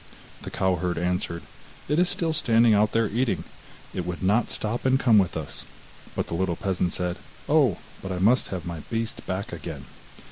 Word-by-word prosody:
The - - -6
cow 95 -1 +1
herd 90 -1 -1
answered: 90 -1 -1 0.4
'It 150 +3 +2
is 180 0 +4
still 165 -2 0
standing 115 -6 +4
out 105 +1 +4
there 115 -1 +2
eating. 105 -6 0 0.5
It 90 - -2
would 90 +1 -5
not 105 +5 +3
stop 110 +3 -2
and 130 0 +3
come 115 -6 +6
with 95 -4 +1
us.' 75 -2 -6 0.5
But - - 0
the - - -6
little 90 0 0
peasant 95 -3 -1
said: 90 -1 -1 0.3
'Oh, - - +4 0.2
but 95 - -5
I 90 - -2
must 110 +8 +3
have 90 -4 -5
my 85 -2 -4
beast 115 -1 -3
back 95 +1 -3
again. 80 -4 -6
95 Hz, 190 wpm, -26 LUFS, 90-115 Hz, 0.5 s, come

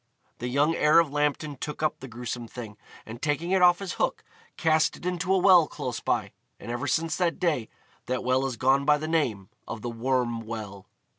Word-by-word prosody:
The 120 - -3
young 145 +6 +2
heir 150 0 +4
of 165 -4 +4
Lambton 145 0 -1
took 150 +3 -5
up 155 - 0
the 135 - -8
gruesome 120 0 -6
thing, 110 -3 -8 0.3
and, 115 +3 -9
taking 155 +3 -1
it 190 -1 +3
off 175 -1 +6
his 195 -2 -5
hook, - - 0 0.3
cast 160 -1 +2
it - - -12
into 180 +1 -1
a 190 - +5
well 180 -4 +6
close 125 -2 -5
by, - - -1 0.3
and 120 - -7
ever 120 +4 -3
since 160 +3 0
that 175 -2 0
day 150 -11 0 0.4
that 125 0 -2
well 130 +1 +2
has 130 -3 -3
gone 135 +3 +3
by 150 +1 +4
the 155 +1 -5
name 120 - 0 0.2
of 110 - -6
the 120 - -3
Worm 120 -1 -1
Well. 105 -4 -7
140 Hz, 210 wpm, -27 LUFS, 120-165 Hz, 0.4 s, off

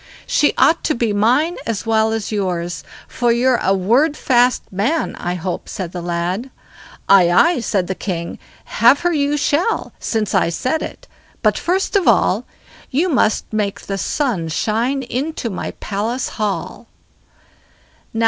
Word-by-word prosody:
"She 295 - +2
ought 330 - +4
to 310 - +1
be 230 -3 0
mine 255 - +2
as 230 -2 -2
well 220 0 +2
as 225 -1 -3
yours; 180 -4 -2 0.2
for 240 -1 0
you're 245 +1 +2
a 195 +1 +2
word 245 - +2
fast 250 -2 +2
man, 245 - 0
I 175 +1 -3
hope", 180 +1 -4
said 180 -4 -5
the 180 - -5
lad. 175 +7 -2 0.6
"Aye, 185 -3 +6
aye!" 330 - +4
said 200 -5 0
the 190 - -2
king, 175 -3 -5 0.3
"have 240 +7 +4
her 350 0 +1
you 290 -1 +1
shall, 315 +9 0
since 220 -2 -2
I 185 -4 +3
said 255 - -1
it; - - -8 0.4
but - - +3
first 375 +4 -1
of 395 - +2
all, - - +3 0.4
you 315 +8 +1
must 225 -7 +1
make 205 -2 -1
the 195 -1 -4
sun 225 - -1
shine 230 - -1
into 255 -1 -3
my 185 - -4
palace 220 +5 -2
hall." 210 -2 -4
225 Hz, 155 wpm, -19 LUFS, 190-280 Hz, 0.6 s, Aye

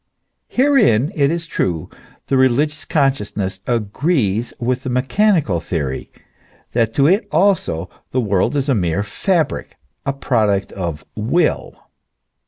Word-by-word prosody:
Herein, 235 - +3
it 140 -2 +2
is 170 +1 -2
true, 85 - -2 0.4
the 135 - 0
religious 140 +4 +2
consciousness 105 - 0
agrees 120 - 0
with 125 +1 -1
the 130 - -4
mechanical 135 - +2
theory, 75 -6 -3 0.6
that 115 -1 0
to 140 - +4
it 190 +8 +3
also 165 - +1 0.2
the 130 - 0
world 100 +2 +1
is 140 -1 0
a 140 - +3
mere 90 -2 0
fabric, 160 - -1 0.3
a 140 - -1
product 110 -7 0
of 85 -5 -5
Will. 140 +10 0
125 Hz, 125 wpm, -19 LUFS, 100-150 Hz, 0.6 s, to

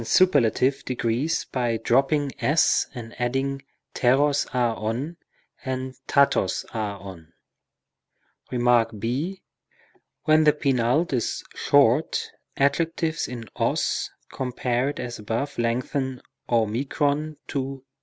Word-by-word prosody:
35 115 - -7
superlative 135 - +3
degrees 125 +5 -1
by 120 -3 -1
dropping 135 +5 +2
s 150 +3 +3
and 115 -2 -7
adding 135 +2 -1 0.4
repos, 140 +3 +3
a, - - -3 0.2
ov 115 +10 -3 0.5
and 130 0 -3 0.2
raros, 140 -9 +3
α, 105 -3 -3
OV. 90 -4 -10 1.2
Kem. 125 -1 -2
ὃ. 120 - +1 0.9
When 155 0 +5
the 150 - +6
penult 135 +2 +1
is 120 -3 -1
short, - - +3 0.3
adjectives 160 +3 +1
in 120 -3 -7
os - - 0 0.2
compared 125 +1 -1
as 120 -2 -5
above 115 +7 -3
lengthen 125 +2 -1 0.3
o 115 -2 +3 0.8
tow. 135 -1 -4
130 Hz, 105 wpm, -25 LUFS, 115-140 Hz, 1.2 s, the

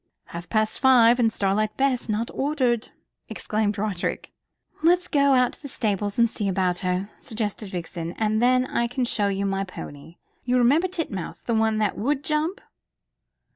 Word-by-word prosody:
"Half 170 +1 -7
past 215 -1 +1
five, 245 -2 +5
and 225 -2 +3
Starlight 210 +1 0
Bess 265 -3 0
not 215 +2 -1
ordered," 260 -5 0 0.4
exclaimed 210 -1 -2
Roderick. 200 -3 -3 0.5
"Let's 355 +2 +3
go 280 -2 +3
out 250 -1 +3
to - - -12
the 285 - -7
stables 205 -5 -2
and 235 0 +5
see 215 -2 -3
about 185 -2 0
her," 185 +2 -2
suggested 215 -2 -4
Vixen. 170 -2 -5
"And 215 +1 0
then 255 +1 +3
I 235 -2 -1
can 245 +1 -2
show 210 -4 +1
you 200 0 -1
my 195 0 -1
pony. 165 -4 -10 0.3
You 250 0 +1
remember 280 +9 +4
Titmouse, 320 - -5
the 235 - -1
one 220 -1 +2
that 210 -2 0
would 275 +6 0
jump?" 310 +5 -1
220 Hz, 170 wpm, -24 LUFS, 200-255 Hz, 0.5 s, five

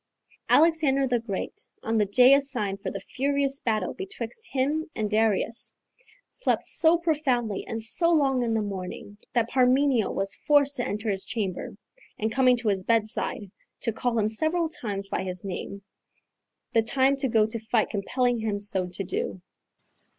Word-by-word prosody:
Alexander 305 -4 +4
the 245 -1 +1
Great, 210 -4 -5 0.2
on 225 0 0
the 210 - +2
day 250 +6 +6
assigned 245 -9 0
for 195 - -3
that 195 0 -7
furious 275 0 0
battle 220 -2 -1
betwixt 430 +4 -7
him 290 +4 -1
and 215 -1 -2
Darius, 220 +1 0 0.5
slept - - -1
so 330 +1 +5
profoundly 270 - -1
and 225 -1 -4
so 335 +9 +2
long 275 -5 +2
in 230 -2 0
the 220 - 0
morning, 200 +1 -7
that 235 -2 +2
Parmenio 255 -2 +3
was 195 0 -1
forced 285 -1 +3
to 245 - -1
enter 210 +2 -2
his 195 -1 +3
chamber, 195 -4 -4 0.4
and 220 +1 -1
coming 255 +1 +4
to 235 -2 -1
his 190 -2 0
bedside, 215 -2 -1 0.3
to 230 - -1
call 240 +1 -1
him 215 -1 +2
several 315 +9 0
times 205 - -3
by 190 - -2
his 185 0 -5
name, 195 +1 -6 0.9
the 225 - +4
time 265 +4 +2
to 270 - 0
go 225 -3 +3
to 220 +1 -4
fight 220 0 0
compelling 245 +4 0
him 215 -2 -2
so 195 -3 -1
to 180 +2 -5
do. 190 - -3
230 Hz, 165 wpm, -26 LUFS, 205-275 Hz, 0.9 s, day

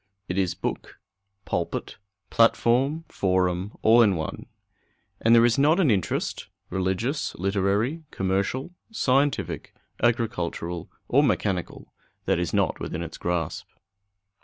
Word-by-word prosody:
It 90 - -3
is 95 -2 0
book, - - -5 0.5
pulpit, - - -3 0.3
platform, 120 +7 +3
forum, 95 -1 0
all 115 +2 +7
in 100 -5 +4
one. 80 -1 -5 0.7
And 115 +1 +5
there 115 0 +7
is 120 +3 +2
not 155 +6 +4
an 160 -10 +4
interest 95 -5 -1 0.2
religious, 95 - -1
literary, 100 - 0
commercial, 95 - -1 0.2
scientific, 140 - 0 0.3
agricultural, 90 -7 -1 0.2
or 140 - +4
mechanical 105 - -1 0.3
that - - +1
is - - -1
not - - +1
within 85 - -4
its 80 -1 -8
grasp. 85 -2 -2
105 Hz, 115 wpm, -25 LUFS, 90-130 Hz, 0.7 s, all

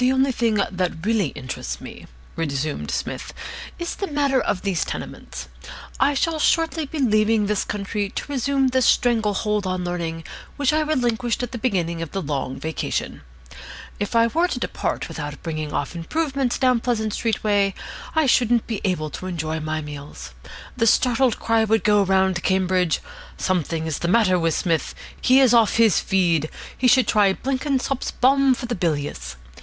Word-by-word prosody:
"The 250 +1 +4
only 265 +1 +3
thing 230 -3 +1
that 185 -4 -1
really 215 -5 +2
interests 130 -1 -6
me," - - -10 0.3
resumed 150 -2 -2
Psmith, - - -4 0.4
"is 345 -1 -3
the 395 - -4
matter 285 -4 +1
of 185 - -1
these 195 -5 0
tenements. - - -7 0.5
I 280 +2 +3
shall 320 +3 0
shortly 325 -1 +1
be 315 - -6
leaving 215 -4 +3
this 210 0 0
country 205 0 -3
to - - -5
resume 275 0 +1
the 260 0 +1
strangle 225 -4 +3
hold 210 -1 0
on 185 -1 -2
Learning 170 -2 -3 0.3
which 285 -1 +2
I 310 - +3
relinquished 245 -6 0
at 245 - -4
the 240 - -5
beginning 175 -8 -1
of 165 - -6
the 195 - -1
Long 140 -3 -3
Vacation. 160 0 -3 0.8
If 205 +2 -3
I 230 0 +6
were 330 +9 +2
to - - -3
depart - - -2
without 145 -1 -7
bringing 155 -2 -4
off 145 +4 -3
improvements 270 - -1
down 255 -2 +3
Pleasant 220 -3 -1
Street 225 -1 -1
way, 200 -2 +2 0.4
I 315 -1 +4
shouldn't 240 -2 +3
be 220 -4 -4
able 165 -6 -1
to 185 - -6
enjoy 160 -3 -3
my 155 0 -3
meals. 145 -1 -9 0.4
The 230 -3 +2
startled 250 +2 +3
cry 225 -1 +2
would 220 0 +2
go 210 -1 +4
round 190 -2 +2
Cambridge: 185 -3 +1 0.4
'Something 165 -3 -1
is 160 -3 -2
the 170 - -2
matter 185 -2 +3
with 165 -2 +1
Psmith. 165 -3 -1 0.3
He 260 +1 +5
is 260 -3 +5
off 230 -3 +4
his 225 -4 +5
feed. 170 -6 +1 0.3
He 255 - +1
should 250 +1 +5
try 205 -3 +4
Blenkinsop's 270 +1 -1
Balm 270 0 +3
for 245 - -6
the 240 - -3
Bilious.' 145 - -2
210 Hz, 175 wpm, -22 LUFS, 170-255 Hz, 0.8 s, I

